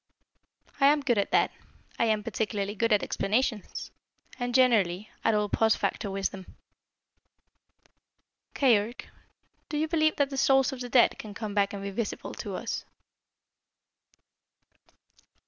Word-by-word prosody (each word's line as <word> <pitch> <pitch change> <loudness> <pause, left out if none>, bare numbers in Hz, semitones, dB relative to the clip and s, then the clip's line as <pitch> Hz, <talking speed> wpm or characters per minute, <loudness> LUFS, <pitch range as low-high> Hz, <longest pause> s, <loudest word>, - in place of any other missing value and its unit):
"I 275 - +6
am 295 +1 +4
good 245 -6 +1
at 200 - 0
that. - - +3 0.5
I - - +3
am 215 -2 +1
particularly 205 -2 -2
good 230 +2 0
at 210 - +3
explanations 215 +1 -2 0.5
and, 245 0 -2
generally, 215 -7 +3
at 225 - +3
all 210 0 +1
post 220 +2 +2
facto 205 - -2
wisdom." 195 -1 -4 2.0
"Keyork, 235 -3 +1 0.6
do 300 - -2
you 310 +1 0
believe 310 -1 +2
that 285 -1 0
the 270 - -4
souls 270 0 +3
of 260 - -7
the 245 - -5
dead 240 -1 +4
can 210 -2 -8
come 215 -2 -5
back 200 -1 +2
and 200 -1 -6
be 200 - -4
visible 210 +2 -4
to - - -6
us?" - - -4
225 Hz, 140 wpm, -28 LUFS, 205-260 Hz, 2.0 s, I